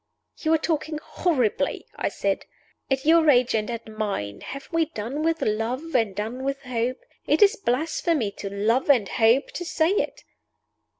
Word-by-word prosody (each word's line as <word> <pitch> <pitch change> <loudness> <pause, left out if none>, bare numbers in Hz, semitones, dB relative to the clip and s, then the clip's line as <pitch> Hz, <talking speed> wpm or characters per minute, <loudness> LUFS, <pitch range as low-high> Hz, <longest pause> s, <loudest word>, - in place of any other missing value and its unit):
"You 315 - 0
are - - +4
talking 310 -1 -2
horribly," 300 - 0
I - - -1
said. - - -2 0.4
"At 270 0 0
your 320 0 +5
age 250 -3 +4
and 215 0 0
at 230 -1 -5
mine, 205 - -4
have 275 0 -7
we 330 -1 +2
done 275 -1 -5
with 325 +1 0
love 245 +9 -2
and 225 -6 +2
done 225 +6 -4
with 275 0 -2
hope? 250 0 -1 0.3
It 305 +6 +5
is 410 +3 +5
blasphemy 305 - 0
to 200 - -4
Love 220 +8 +1
and 240 -8 +5
Hope 230 +7 +3
to 355 - -5
say 330 0 +1
it!" 405 - -1
260 Hz, 170 wpm, -25 LUFS, 225-315 Hz, 0.4 s, your